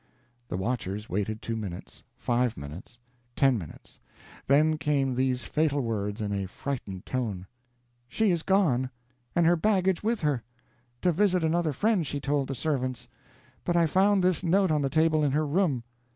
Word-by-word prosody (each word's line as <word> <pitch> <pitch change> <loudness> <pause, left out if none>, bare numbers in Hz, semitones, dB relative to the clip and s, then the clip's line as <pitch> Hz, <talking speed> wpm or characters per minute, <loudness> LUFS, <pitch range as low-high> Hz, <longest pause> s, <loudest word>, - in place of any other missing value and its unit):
The 90 - -3
watchers 105 -1 -3
waited 105 +3 -2
two 115 - -2
minutes 100 -6 -7 0.2
five 120 -1 0
minutes 75 +11 -9 0.4
ten 135 -2 +4
minutes. 85 -9 -9 0.5
Then 155 +3 +4
came 140 -4 +1
these 130 0 0
fatal 150 -2 +1
words, 105 -3 -2
in 105 -1 -2
a 100 -1 -2
frightened 100 -4 -5
tone: 110 -8 -3 0.6
"She 215 - +2
is 170 -2 +1
gone, 155 -10 +2 0.5
and 170 - +4
her 170 +1 +5
baggage 190 0 +2
with 225 +1 0
her. 145 -6 +1 0.6
To 180 - +4
visit 185 0 +2
another 160 0 +1
friend, 195 - +1
she 145 - -3
told 140 -1 0
the 135 - -4
servants. 130 -4 -2 0.6
But 175 - 0
I 170 -1 +5
found 190 +4 +3
this 180 -2 +2
note 185 +1 +3
on 150 -1 +2
the 135 - 0
table 155 +1 +3
in 140 -2 +1
her 155 +1 +2
room. 150 -5 +1
140 Hz, 165 wpm, -28 LUFS, 120-170 Hz, 0.6 s, her